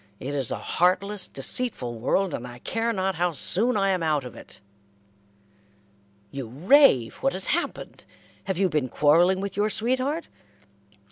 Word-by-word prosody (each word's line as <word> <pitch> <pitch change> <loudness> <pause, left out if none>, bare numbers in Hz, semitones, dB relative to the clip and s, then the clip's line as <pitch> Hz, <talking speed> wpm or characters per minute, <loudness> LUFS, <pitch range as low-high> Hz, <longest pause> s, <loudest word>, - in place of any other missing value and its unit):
It 140 +3 -5
is 135 -4 0
a - - -2
heartless, 185 +2 0
deceitful 135 - -1
world, 190 +10 0
and 125 - -5
I 120 0 -11
care 225 - -2
not 190 -3 -1
how 175 0 -1
soon 215 - +1
I 195 -1 +2
am 185 -2 -1
out 155 -3 0
of 125 - -9
it." - - -13 1.7
"You 135 -3 -6
rave. 150 - +4
What 180 - -1
has 185 +1 -1
happened? 345 - -4 0.4
Have 190 -3 -2
you 195 0 +2
been 150 -6 -1
quarrelling 170 +8 +3
with 200 -1 -5
your 205 +2 +1
sweetheart?" 260 +9 -1
185 Hz, 155 wpm, -25 LUFS, 145-210 Hz, 1.7 s, rave